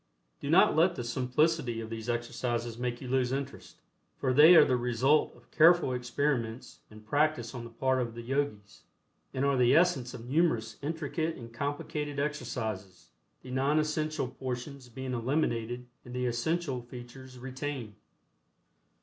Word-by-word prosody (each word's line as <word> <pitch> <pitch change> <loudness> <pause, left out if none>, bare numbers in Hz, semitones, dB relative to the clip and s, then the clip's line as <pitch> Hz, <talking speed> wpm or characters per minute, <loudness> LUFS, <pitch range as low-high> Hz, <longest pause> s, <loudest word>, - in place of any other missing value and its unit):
Do 140 - -5
not 175 +5 +5
let 175 +3 +4
the 120 - -4
simplicity 125 +1 0
of 110 0 -7
these 115 +1 -5
exercises 120 0 -2
make 120 -1 -3
you 130 - -6
lose 125 -1 +1
interest, 135 +1 -5 0.4
for 130 -1 0
they 155 +6 +9
are - - +9
the 130 - +2
result 125 +5 +2
of - - -22
careful 165 -4 +5
experiments 125 -2 -2
and 110 0 -14
practice 145 -1 +1
on 120 -2 -6
the - - -9
part 130 +2 0
of 115 -2 -4
the 120 - -7
Yogis, 120 -6 -3 0.5
and 130 +1 -1
are 140 0 +3
the 125 +2 +5
essence 155 -8 +2
of 115 - -9
numerous 125 -7 +1
intricate 160 +2 -2
and 115 -2 -10
complicated 145 +2 -3
exercises, 110 -10 -4 0.3
the 130 - -9
non 135 +4 +1
essential 155 -2 0
portions 130 +1 -6
being 130 +2 -5
eliminated 120 -1 -1 0.2
and 125 0 -9
the 125 0 -1
essential 130 +3 -1
features 125 +1 -11
retained. 130 -3 -5
130 Hz, 155 wpm, -30 LUFS, 120-145 Hz, 0.5 s, they